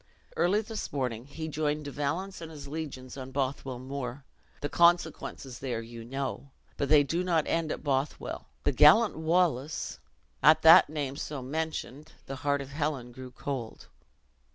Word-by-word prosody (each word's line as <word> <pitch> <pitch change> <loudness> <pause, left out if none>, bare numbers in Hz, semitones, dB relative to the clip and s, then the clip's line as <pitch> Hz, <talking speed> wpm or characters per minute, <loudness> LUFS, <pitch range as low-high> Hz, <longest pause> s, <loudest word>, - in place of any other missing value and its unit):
Early 200 +5 +3
this 220 0 -5
morning 125 -3 -3
he 160 +3 -6
joined 150 -1 -1
De 145 - -5
Valence 170 +8 -3
and 165 - -7
his 145 -3 -9
legions 140 -4 -6
on 130 -1 -6
Bothwell 135 -1 -2
Moor. 130 0 -5 0.4
The 145 - -1
consequences 165 -6 +1
there 120 -4 -3
you 115 0 -9
know. 135 +2 -4 0.3
But 140 - -2
they 150 -1 +7
do 165 +6 -1
not 170 -4 +2
end 165 -2 0
at - - -5
Bothwell. 140 0 -2 0.2
The - - +2
gallant 155 - +6
Wallace 160 -3 0 0.2
" - - -40
At - - +6
that - - +9
name, 145 -3 -3
so 145 -4 -5
mentioned, 155 0 -4
the 135 - -6
heart 145 0 0
of 135 - -8
Helen 145 -4 -2
grew 130 +1 -9
cold. 125 -3 -6
145 Hz, 165 wpm, -29 LUFS, 130-160 Hz, 0.4 s, that